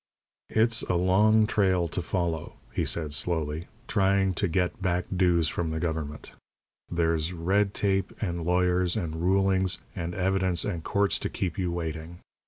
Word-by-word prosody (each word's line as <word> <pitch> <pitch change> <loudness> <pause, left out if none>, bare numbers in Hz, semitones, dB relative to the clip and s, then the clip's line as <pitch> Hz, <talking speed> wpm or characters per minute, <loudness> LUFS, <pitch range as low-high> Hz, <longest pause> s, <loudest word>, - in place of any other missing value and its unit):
"It's 115 +1 +3
a 90 - -1
long 105 +5 +4
trail 95 -5 +2
to - - -2
follow," 85 -3 -2 0.2
he - - 0
said, 75 -3 0
slowly, 80 +1 -1 0.2
"trying 95 -2 +2
to 100 +3 0
get 90 +2 -1
back 90 -2 0
dues 90 -3 +3
from 85 0 -2
the 80 0 -2
government. 80 -3 -4 0.6
There's 85 0 0
red 95 +4 +1
tape 95 -2 +1
and 85 -5 -2
lawyers 90 +1 +1
and 80 -2 -3
rulings 95 +1 +2 0.2
and 85 +1 -4
evidence 95 -1 +1
and 85 -6 -3
courts 100 +2 +1
to - - -3
keep 90 0 -3
you 90 -2 0
waiting. 80 0 -5
90 Hz, 155 wpm, -27 LUFS, 85-95 Hz, 0.6 s, long